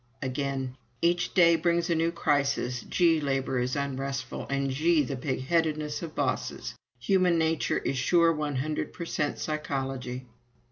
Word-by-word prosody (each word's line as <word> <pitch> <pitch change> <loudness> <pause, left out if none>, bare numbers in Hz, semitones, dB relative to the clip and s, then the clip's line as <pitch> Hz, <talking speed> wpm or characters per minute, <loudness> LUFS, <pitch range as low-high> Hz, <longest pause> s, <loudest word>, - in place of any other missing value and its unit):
Again: 135 -1 -2 0.3
"Each 175 +1 +2
day 170 -3 +6
brings 170 +1 +1
a - - +5
new 165 +1 +1
crisis. 140 -6 0
Gee, 165 -3 +3
labor 135 -2 0
is 125 +2 -1
unrestful... 135 -2 -3
and 140 0 0
gee, 155 +3 +3
the 135 +1 -3
pigheadedness 150 +3 -1
of 165 -3 -7
bosses! - - -2 0.2
Human 180 +6 +3
nature 160 0 +1
is 135 - -1
sure 170 +4 +4
one 150 -2 -2
hundred 150 +4 -2
per 170 - -6
cent 150 -3 -1
psychology." 135 -4 -3
145 Hz, 145 wpm, -28 LUFS, 135-165 Hz, 0.3 s, day